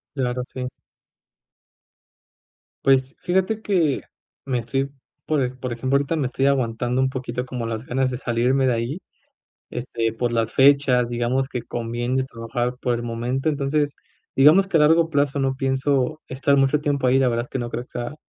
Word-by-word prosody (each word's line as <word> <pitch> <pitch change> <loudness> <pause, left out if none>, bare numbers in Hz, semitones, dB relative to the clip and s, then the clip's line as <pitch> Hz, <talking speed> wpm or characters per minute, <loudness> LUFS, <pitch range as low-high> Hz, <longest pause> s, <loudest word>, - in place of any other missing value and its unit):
Claro, 125 -2 -1
sí. 130 0 -5 2.2
Pues, 135 +1 +3
fíjate 190 +5 0
que 170 -10 +1 0.4
me 130 -2 0
estoy 135 +4 -1 0.4
por 150 -3 +2
e 125 - -1
por 130 -1 -6
ejemplo, 130 +4 +1
ahorita 145 +4 -1
me 150 -4 0
estoy 135 +1 0
aguantando 125 -2 0
un 130 0 +2
poquito 125 -1 -4
como 125 -2 -4
las 115 +1 -4
ganas 130 +1 0
de 125 - -3
salirme 125 +2 +1
de 125 - +3
ahí 120 +8 -2 0.7
este 115 -2 -2
por 120 +2 -1
las 115 -1 0
fechas. 135 -3 +4
Digamos 120 +2 0
que 125 -3 -4
conviene 120 +2 -2
trabajar 120 0 -3
por 125 -2 0
el 120 - -3
momento. 120 +4 -2
Entonces 145 0 0 0.4
digamos 155 +8 +6
que 185 - +1
a - - +5
largo 165 +2 +4
plazo 145 -2 +1
no 135 -1 0
pienso 135 +2 0
estar 140 +2 +1
mucho 135 +2 +3
tiempo 140 -3 0
ahí. 130 +1 +4
La 135 - +3
verdad 120 0 -1
es - - -28
que 135 - -4
no 120 -1 -3
creo 120 0 -4
que 125 - -19
sea 120 +4 -4
130 Hz, 180 wpm, -23 LUFS, 120-140 Hz, 2.2 s, digamos